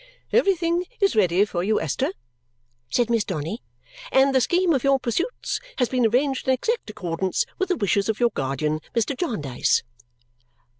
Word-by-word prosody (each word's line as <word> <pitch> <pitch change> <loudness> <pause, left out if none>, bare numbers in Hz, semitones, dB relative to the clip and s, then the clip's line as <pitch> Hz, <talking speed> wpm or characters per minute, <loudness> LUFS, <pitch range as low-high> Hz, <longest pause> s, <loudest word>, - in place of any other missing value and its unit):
"Everything 360 -6 +2
is 395 -2 +2
ready 190 -1 +4
for 175 -4 -3
you, 215 +3 +2
Esther," 255 - -1 0.8
said 240 -2 +1
Miss 230 -2 +2
Donny, 175 +4 -4 0.5
"and 270 +1 +4
the 260 - +4
scheme 350 +5 +2
of 270 - 0
your 275 0 +4
pursuits 340 - -2 0.2
has 250 -3 +1
been 250 -3 +2
arranged 265 +4 0
in 260 - +4
exact 460 - -2
accordance 185 -2 -2
with 380 - 0
the 365 - +1
wishes 200 0 +1
of 220 - -1
your 240 -1 +3
guardian, 140 +3 -1 0.2
Mr. 235 +4 +1
Jarndyce." 150 - 0
240 Hz, 160 wpm, -24 LUFS, 190-285 Hz, 0.8 s, ready